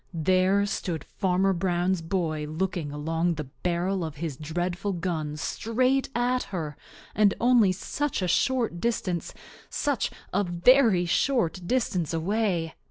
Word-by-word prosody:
There 185 Hz, +4 st, +3 dB
stood 175 Hz, -6 st, -3 dB
Farmer 190 Hz, 0 st, +1 dB
Brown's 180 Hz, 0 st, 0 dB
boy 160 Hz, -3 st, -2 dB
looking 160 Hz, -1 st, -2 dB
along 165 Hz, +3 st, -1 dB
the 150 Hz, -, -4 dB, 0.2 s
barrel 180 Hz, +1 st, 0 dB
of 160 Hz, -2 st, -5 dB
his 155 Hz, -1 st, -4 dB
dreadful 175 Hz, +6 st, -2 dB
gun 160 Hz, -4 st, -3 dB
straight 255 Hz, -, 0 dB
at 250 Hz, +1 st, +1 dB
her, 160 Hz, -6 st, -4 dB, 0.4 s
and 210 Hz, -2 st, +3 dB
only 235 Hz, -5 st, +5 dB
such 255 Hz, +5 st, -2 dB
a -, -, 0 dB
short 235 Hz, -1 st, +1 dB
distance, 185 Hz, -7 st, -1 dB, 0.4 s
such 285 Hz, -7 st, 0 dB, 0.2 s
a 200 Hz, +2 st, +2 dB
very 185 Hz, +2 st, +4 dB
short 190 Hz, -1 st, +1 dB
distance 185 Hz, -, 0 dB
away! 175 Hz, -2 st, 0 dB
180 Hz, 130 wpm, -27 LUFS, 165-210 Hz, 0.4 s, only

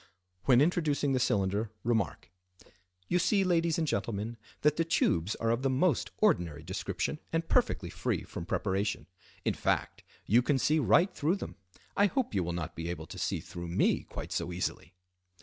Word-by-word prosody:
When 125 Hz, -1 st, +6 dB
introducing 150 Hz, -3 st, +2 dB
the 130 Hz, -, +2 dB
cylinder 100 Hz, 0 st, +1 dB
remark:—"You 90 Hz, -, -4 dB
see, 195 Hz, +2 st, +3 dB
Ladies 170 Hz, -3 st, +2 dB
and 165 Hz, -, +1 dB
Gentlemen, 115 Hz, -3 st, -2 dB, 0.3 s
that 150 Hz, 0 st, +4 dB
the 165 Hz, -, +2 dB
tubes 100 Hz, -, +1 dB
are 115 Hz, 0 st, 0 dB
of 115 Hz, +2 st, 0 dB
the 135 Hz, -, +1 dB
most 135 Hz, +3 st, +2 dB
ordinary 80 Hz, -4 st, +1 dB
description 95 Hz, -, -3 dB
and 165 Hz, 0 st, -1 dB
perfectly -, -, +1 dB
free -, -, -1 dB
from 85 Hz, -, -7 dB
preparation; 100 Hz, -3 st, -1 dB, 0.4 s
in -, -, +2 dB
fact, -, -, -1 dB, 0.2 s
you 115 Hz, +5 st, +5 dB
can 135 Hz, +3 st, +2 dB
see 155 Hz, +4 st, +2 dB
right 170 Hz, +6 st, +4 dB
through 160 Hz, +5 st, +1 dB
them. 195 Hz, -, -7 dB, 0.4 s
I 205 Hz, -, +5 dB
hope 255 Hz, -, -1 dB
you 95 Hz, -3 st, +1 dB
will 85 Hz, -, -2 dB
not 85 Hz, -1 st, -4 dB
be 85 Hz, +1 st, -4 dB
able 80 Hz, -2 st, -4 dB
to -, -, -9 dB
see -, -, -1 dB
through 85 Hz, -1 st, -7 dB
me 85 Hz, -, +2 dB
quite -, -, -8 dB
so -, -, -2 dB
easily." 90 Hz, 0 st, -4 dB
115 Hz, 175 wpm, -31 LUFS, -, 0.4 s, When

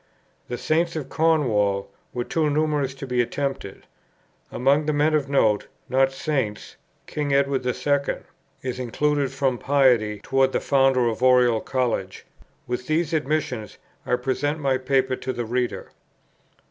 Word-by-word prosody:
The 120 Hz, -, -4 dB
Saints 165 Hz, +4 st, 0 dB
of 145 Hz, -4 st, -4 dB
Cornwall 110 Hz, -12 st, +1 dB, 0.2 s
were 120 Hz, -, -3 dB
too 155 Hz, +5 st, 0 dB
numerous 145 Hz, -3 st, 0 dB
to 135 Hz, -, -7 dB
be 125 Hz, -2 st, +1 dB
attempted. 135 Hz, -5 st, -4 dB, 0.7 s
Among 140 Hz, +4 st, +2 dB
the 155 Hz, -, +1 dB
men 150 Hz, +2 st, +2 dB
of 145 Hz, -3 st, +1 dB
note, 110 Hz, -7 st, +2 dB, 0.2 s
not 135 Hz, +1 st, +3 dB
Saints, 135 Hz, -7 st, -3 dB, 0.3 s
King 145 Hz, -2 st, -1 dB
Edward 140 Hz, -1 st, +1 dB
II. 140 Hz, +3 st, 0 dB, 0.5 s
is 130 Hz, -1 st, -4 dB
included 140 Hz, +3 st, 0 dB
from 135 Hz, -3 st, 0 dB
piety 125 Hz, -7 st, +3 dB
towards 135 Hz, 0 st, +2 dB
the -, -, +2 dB
founder 135 Hz, -3 st, +3 dB
of 115 Hz, +1 st, -2 dB
Oriel 125 Hz, -3 st, +5 dB
College. 120 Hz, -8 st, -2 dB, 0.4 s
With 125 Hz, +1 st, -4 dB
these 160 Hz, +1 st, 0 dB
admissions 145 Hz, -8 st, -2 dB, 0.3 s
I 125 Hz, -, +1 dB
present 135 Hz, +4 st, -1 dB
my 135 Hz, -4 st, 0 dB
Paper 130 Hz, 0 st, +1 dB
to 130 Hz, -, -4 dB
the 120 Hz, -2 st, -4 dB
reader. 125 Hz, +2 st, -2 dB
135 Hz, 145 wpm, -24 LUFS, 125-145 Hz, 0.7 s, Oriel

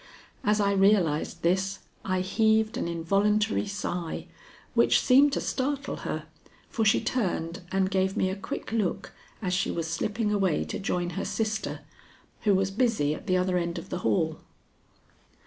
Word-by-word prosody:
As 210 Hz, +1 st, +2 dB
I 200 Hz, -1 st, +3 dB
realized 195 Hz, -6 st, +2 dB
this 190 Hz, +3 st, +1 dB, 0.3 s
I 185 Hz, -1 st, 0 dB
heaved 220 Hz, +3 st, +2 dB
an -, -, -2 dB
involuntary 200 Hz, +6 st, +1 dB
sigh, 180 Hz, -4 st, -4 dB, 0.5 s
which -, -, +4 dB
seemed 275 Hz, +3 st, +5 dB
to -, -, 0 dB
startle 280 Hz, +1 st, -2 dB
her, -, -, -4 dB, 0.5 s
for 225 Hz, -, 0 dB
she 215 Hz, -, +4 dB
turned 180 Hz, -8 st, -2 dB
and 190 Hz, 0 st, +1 dB
gave 190 Hz, 0 st, +1 dB
me 185 Hz, -, +1 dB
a -, -, -3 dB
quick 210 Hz, +7 st, -6 dB
look 205 Hz, -3 st, -1 dB, 0.3 s
as 180 Hz, -1 st, 0 dB
she 195 Hz, +1 st, +1 dB
was 165 Hz, -1 st, -2 dB
slipping 210 Hz, +6 st, -1 dB
away 190 Hz, -6 st, +1 dB
to -, -, -5 dB
join 175 Hz, -2 st, -1 dB
her -, -, -3 dB
sister, 220 Hz, -1 st, -2 dB, 0.6 s
who 205 Hz, -2 st, +5 dB
was 190 Hz, 0 st, +1 dB
busy 210 Hz, -, +1 dB
at -, -, -9 dB
the 185 Hz, -, +3 dB
other 180 Hz, 0 st, +1 dB
end 170 Hz, 0 st, -3 dB
of 170 Hz, +3 st, -7 dB
the 180 Hz, -, -3 dB
hall. 160 Hz, -4 st, 0 dB
195 Hz, 165 wpm, -27 LUFS, 180-215 Hz, 0.6 s, seemed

